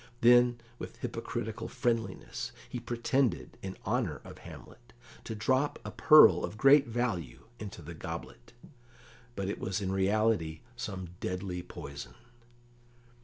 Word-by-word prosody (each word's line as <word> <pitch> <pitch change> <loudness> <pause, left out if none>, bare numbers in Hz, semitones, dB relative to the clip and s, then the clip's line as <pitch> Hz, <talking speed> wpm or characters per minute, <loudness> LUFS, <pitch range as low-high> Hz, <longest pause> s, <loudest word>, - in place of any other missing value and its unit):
Then, 120 0 +6 0.2
with - - -7
hypocritical - - -4
friendliness, 115 -2 -2 0.2
he 125 - -5
pretended, 120 - 0
in 95 -1 -6
honour - - 0
of - - -11
Hamlet, 120 0 -13 0.3
to 110 - -4
drop 130 +6 +1
a - - -4
pearl 155 -1 +7
of 105 - -4
great 135 +3 +6
value 115 - -2 0.2
into 105 -2 -7
the - - -8
goblet, - - -8 0.8
but 100 -1 -2
it 100 - -3
was 95 0 -2
in 95 -2 -2
reality 95 -4 +1
some 95 -6 -5
deadly 90 -1 -3
poison. 70 -7 -9
110 Hz, 125 wpm, -31 LUFS, 95-120 Hz, 0.8 s, pearl